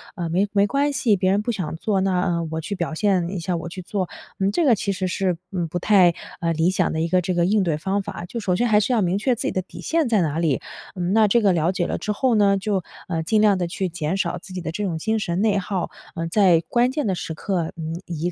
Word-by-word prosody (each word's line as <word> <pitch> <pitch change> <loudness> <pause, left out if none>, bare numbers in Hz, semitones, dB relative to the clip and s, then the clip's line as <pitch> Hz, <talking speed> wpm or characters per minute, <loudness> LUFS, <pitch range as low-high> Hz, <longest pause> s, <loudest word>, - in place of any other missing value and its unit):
呃， 175 -4 -3
没 185 +5 +1
没 200 0 +3
关 280 +4 +1
系。 230 -6 +2
别 185 0 +1
人 200 +1 +2
不 240 - -1
想 180 -8 -4
做， 195 +2 0
那， 190 -2 +1
呃， 170 -2 -1
我 160 0 -2
去 200 +6 -4
表 170 -3 -3
现 185 -1 +1
一 190 -1 -4
下 175 +2 -2
我 170 0 -5
去 185 +2 -7
做。 185 0 -3 0.3
嗯， 195 +1 +2
这 330 +10 +1
个 250 -5 +5
其 200 0 -2
实 190 -1 -2
是， 180 -1 0
嗯， 175 -3 -2
不 175 +3 -3
太， 185 -3 +5 0.3
呃， 170 0 0
理 160 +2 +2
想 185 -1 +1
的 160 - -2
一 165 - +1
个 180 +2 +2
这 180 +1 -1
个 175 -1 +2
应 205 +2 +3
对 165 -4 0
方 190 +6 -1
法。 175 -2 -7
就 235 +7 -5
首 190 -5 0
先 240 +6 +1
还 210 -2 +5
是 215 - 0
要 230 - +3
明 185 0 +1
确 245 +4 +1
自 - - -5
己 - - 0
的 185 - -1
底 185 - -13
线 325 -3 +1
在 215 -4 +3
哪 160 -1 -1
里， 160 -6 +1 0.3
嗯， 180 0 -1
那 220 -1 +5
这 235 +4 +3
个 200 -3 +4
了 165 +1 +2
解 180 -2 -1
了 - - -2
之 210 - -3
后 240 +3 +1
呢， 200 -2 +4
就， 195 -2 -1 0.2
呃， 165 -3 -2
尽 215 +6 +2
量 205 -2 +4
地 175 -1 -1
去 190 +2 -2
减 165 +1 -2
少 180 -2 -1
自 185 +2 -11
己 185 - -4
的 160 - -4
这 205 +5 -3
种 175 -5 -1
精 220 +7 0
神 175 -2 -1
内 210 -2 +2
耗， 190 -1 -2 0.3
呃， 165 0 -2
在 180 -2 +4
关 245 +1 +3
键 295 +1 -2
的 195 - +1
时 165 - -5
刻， 170 0 -2
嗯， 160 +1 -5
以 170 +1 -3
185 Hz, 310 characters per minute, -23 LUFS, 170-205 Hz, 0.3 s, 个